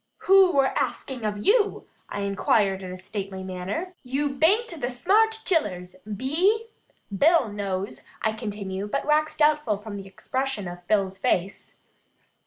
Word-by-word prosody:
"Who 385 -1 +6
wur 275 -1 +3
axing 255 -4 -2
of 205 -1 -3
you?" 420 -1 +2 0.2
I - - -4
inquire 200 0 +2
in 190 -1 -7
a 185 - -6
stately 190 0 -6
manner. 190 - -4
"You 275 +3 -1
bain't 335 - +3
the 245 - 0
smarl 395 - +3 0.2
chillers, 185 - 0 0.2
be 270 - -2
'e? 440 +4 +3 0.5
Bill 310 - +4
knows," 195 -1 -3 0.2
I 220 - +2
continue, 205 -3 -5
but 275 +7 -2
wax 305 +1 +2
doubtful 300 -8 +3
from 205 0 -7
the 195 -1 -8
expression 260 +1 -3
of 175 0 -9
Bill's 195 -2 +1
face. 190 0 -1
220 Hz, 150 wpm, -25 LUFS, 195-300 Hz, 0.5 s, Who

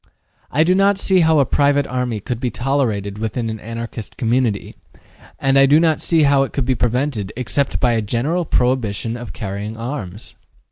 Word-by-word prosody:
I 150 +4 +3
do 180 +3 +3
not 195 +1 +3
see 190 -1 +2
how 160 -2 +4
a 140 - +4
private 145 +2 +2
army 125 -4 -2
could 115 +3 -4
be 125 -1 -1
tolerated 110 -6 -1
within 115 +1 -2
an 110 - -6
Anarchist 115 0 -7
community, 120 -3 0 0.6
and 135 0 +3
I 135 - +6
do 145 +3 +5
not 160 -2 +2
see 165 -2 +2
how 140 -1 +4
it 135 - -2
could 135 - -1
be 130 - +2
prevented 120 -1 -1
except 125 +3 -1
by 125 - +3
a 115 - +1
general 130 - -1
prohibition 120 -6 0
of 120 0 -7
carrying 105 +1 -5
arms. 115 -5 -6
125 Hz, 185 wpm, -19 LUFS, 110-140 Hz, 0.6 s, I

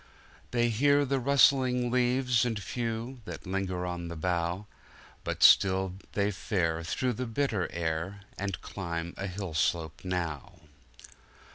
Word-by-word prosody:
They 120 -1 +2
hear 140 +5 +3
the 135 0 0
rustling 130 -2 +4
leaves 125 -1 +2
and 115 -3 -1
few, 115 +3 -4
That - - -7
linger 95 -1 -2
on 90 -1 -4
the 85 - -6
bough; 85 +3 -1 0.6
But - - -2
still 95 -1 +6 0.2
they 100 0 +1
fare 85 -4 -1
through 125 +8 -1
the 125 +3 -4
bitter 115 -6 -1
air, 85 +4 -2
And 100 -2 -3
climb 85 -3 -4
a 100 - -4
hill 95 -2 -5
slope 80 0 0
now. 85 -6 -3
100 Hz, 135 wpm, -29 LUFS, 85-125 Hz, 0.6 s, still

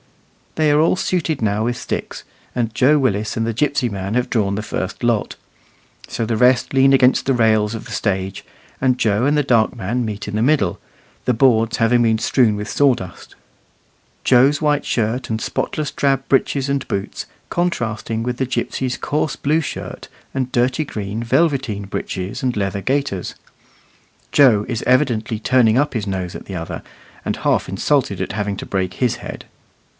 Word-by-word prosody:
They 155 -1 +3
are 150 +1 +4
all 165 - +3
suited 165 -7 -1
now 105 0 +1
with 120 +1 -1
sticks, 125 - -5 0.3
and 115 -3 -1
Joe 135 +6 +4
Willis 110 -6 0
and 115 - 0
the 115 - -1
gipsy 135 +1 +1
man 100 -1 -4
have 125 0 0
drawn 100 -4 +1
the 105 - -3
first 95 -3 -4
lot. 120 -3 0 0.7
So 115 - -2
the 115 0 -1
rest 125 +3 +3
lean 135 0 +5
against 130 -1 +4
the 135 - +2
rails 110 -2 +2
of 110 - -7
the - - -10
stage, 95 -2 -2 0.4
and 130 -1 +2
Joe 110 0 +1
and 145 +1 +2
the 150 - +3
dark 115 -3 +2
man 120 +3 -2
meet 105 -2 -5
in 105 - -4
the 110 - 0
middle, 120 - +2 0.5
the 125 - +2
boards 115 -2 +3
having 120 +1 +3
been 110 -1 +3
strewed 110 -1 +2
with 105 0 -5
sawdust, 125 -11 0 0.9
Joe's 135 +4 +4
white 150 -2 +1
shirt 120 +2 -1
and 110 -1 -1
spotless 150 +5 -2
drab 135 -2 0
breeches 135 0 +1
and 140 -1 -1
boots 100 0 -4 0.2
contrasting 115 -10 -2
with 125 0 -2
the 130 - -1
gipsy's 130 0 -2
coarse 150 -1 -1
blue 155 +3 +1
shirt 150 - -7 0.2
and 130 -1 -2
dirty 125 +5 +1
green 110 -4 -5
velveteen 130 -6 +1
breeches 95 0 -4
and 125 -3 0
leather 100 -1 -1
gaiters. 130 -7 -1 1.0
Joe 120 -8 +5
is 115 - -2
evidently 120 -5 +1
turning 120 -1 +3
up 145 +2 +1
his 110 -4 -3
nose 95 -2 -3
at - - -8
the 95 - -7
other, 85 -1 -5 0.4
and - - -2
half - - 0
insulted 100 +1 0
at 95 - -3
having 105 -2 -2
to - - -6
break 95 -2 -2
his 125 -3 0
head. - - -8
120 Hz, 180 wpm, -20 LUFS, 105-135 Hz, 1.0 s, lean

